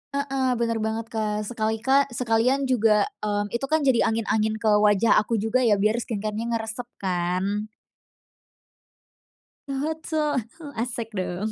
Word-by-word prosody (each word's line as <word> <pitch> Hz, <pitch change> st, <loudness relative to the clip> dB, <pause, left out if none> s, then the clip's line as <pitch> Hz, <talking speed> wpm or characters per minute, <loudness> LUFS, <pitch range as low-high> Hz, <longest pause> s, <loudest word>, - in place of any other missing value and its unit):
Heeh, 270 Hz, -2 st, 0 dB
bener 230 Hz, -1 st, 0 dB
banget, 220 Hz, +1 st, -2 dB
Kak. 215 Hz, -1 st, -1 dB
Sekali 220 Hz, 0 st, -2 dB
ka 275 Hz, +3 st, +4 dB
sekalian 245 Hz, +2 st, +1 dB
juga, 225 Hz, -5 st, +3 dB, 0.2 s
mmm, 205 Hz, -1 st, -2 dB
itu 235 Hz, +3 st, -2 dB
kan 315 Hz, 0 st, +1 dB
jadi 260 Hz, -5 st, +3 dB
angin-angin 220 Hz, -1 st, 0 dB
ke 220 Hz, 0 st, 0 dB
wajah 210 Hz, +1 st, +4 dB
aku 230 Hz, +2 st, -1 dB
juga 225 Hz, +4 st, +1 dB
ya, 230 Hz, -4 st, +4 dB
biar 215 Hz, +4 st, +1 dB
skincare-nya 215 Hz, 0 st, -3 dB
ngeresep 225 Hz, +2 st, -4 dB
kan. 185 Hz, +3 st, -1 dB, 2.0 s
Betul. 300 Hz, +1 st, -1 dB, 0.4 s
Asyik 235 Hz, -1 st, -3 dB
dong. 190 Hz, +1 st, -3 dB
225 Hz, 130 wpm, -25 LUFS, 210-250 Hz, 2.0 s, ka